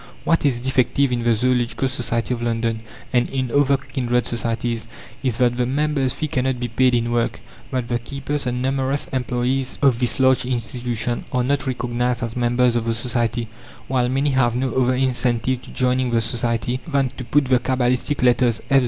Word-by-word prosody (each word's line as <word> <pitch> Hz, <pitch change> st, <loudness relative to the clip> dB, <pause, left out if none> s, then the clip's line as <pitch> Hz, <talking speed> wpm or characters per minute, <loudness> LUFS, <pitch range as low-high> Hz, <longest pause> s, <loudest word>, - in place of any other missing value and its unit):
What 165 Hz, -3 st, +2 dB
is 125 Hz, -4 st, +1 dB
defective 130 Hz, +1 st, +1 dB
in 120 Hz, -1 st, 0 dB
the 115 Hz, -1 st, +2 dB
Zoological 125 Hz, +2 st, +1 dB
Society 120 Hz, -2 st, -1 dB
of 120 Hz, -, -4 dB
London, 115 Hz, -1 st, -1 dB, 0.3 s
and 120 Hz, -1 st, +2 dB
in 130 Hz, -2 st, -2 dB
other 140 Hz, 0 st, +3 dB
kindred 125 Hz, -3 st, -1 dB
societies, 115 Hz, -1 st, -2 dB, 0.3 s
is 125 Hz, -4 st, 0 dB
that 120 Hz, -1 st, +2 dB
the 125 Hz, -1 st, +1 dB
member's 140 Hz, -1 st, +1 dB
fee 155 Hz, -, -3 dB
cannot 130 Hz, -2 st, -1 dB
be 120 Hz, 0 st, -3 dB
paid 125 Hz, +2 st, +3 dB
in 120 Hz, 0 st, 0 dB
work; 120 Hz, -1 st, 0 dB, 0.3 s
that 125 Hz, -2 st, -2 dB
the 120 Hz, 0 st, -1 dB
keepers 140 Hz, +3 st, -4 dB
and 125 Hz, 0 st, -1 dB
numerous 135 Hz, +1 st, 0 dB
employes 130 Hz, +1 st, -1 dB
of 135 Hz, -5 st, +3 dB
this 125 Hz, +2 st, 0 dB
large 130 Hz, -1 st, +4 dB
institution 120 Hz, -1 st, -2 dB
are 125 Hz, -1 st, +1 dB
not 140 Hz, +1 st, 0 dB
recognized 120 Hz, -1 st, -1 dB
as 115 Hz, -1 st, -4 dB
members 120 Hz, 0 st, +2 dB
of 115 Hz, -1 st, 0 dB
the 115 Hz, -1 st, 0 dB
Society, 120 Hz, -1 st, -1 dB, 0.4 s
while 125 Hz, -2 st, +1 dB
many 135 Hz, +3 st, +1 dB
have 120 Hz, -3 st, +2 dB
no 130 Hz, +1 st, -1 dB
other 130 Hz, 0 st, +2 dB
incentive 125 Hz, -1 st, 0 dB
to -, -, -13 dB
joining 130 Hz, 0 st, +1 dB
the 115 Hz, -1 st, +2 dB
society 115 Hz, +1 st, -1 dB
than 140 Hz, -4 st, +1 dB
to 130 Hz, 0 st, -8 dB
put 140 Hz, +4 st, +2 dB
the 130 Hz, -1 st, +3 dB
cabalistic 125 Hz, +2 st, 0 dB
letters 120 Hz, -2 st, +3 dB
F.Z. 135 Hz, -, +7 dB
125 Hz, 190 wpm, -21 LUFS, 120-130 Hz, 0.4 s, F.Z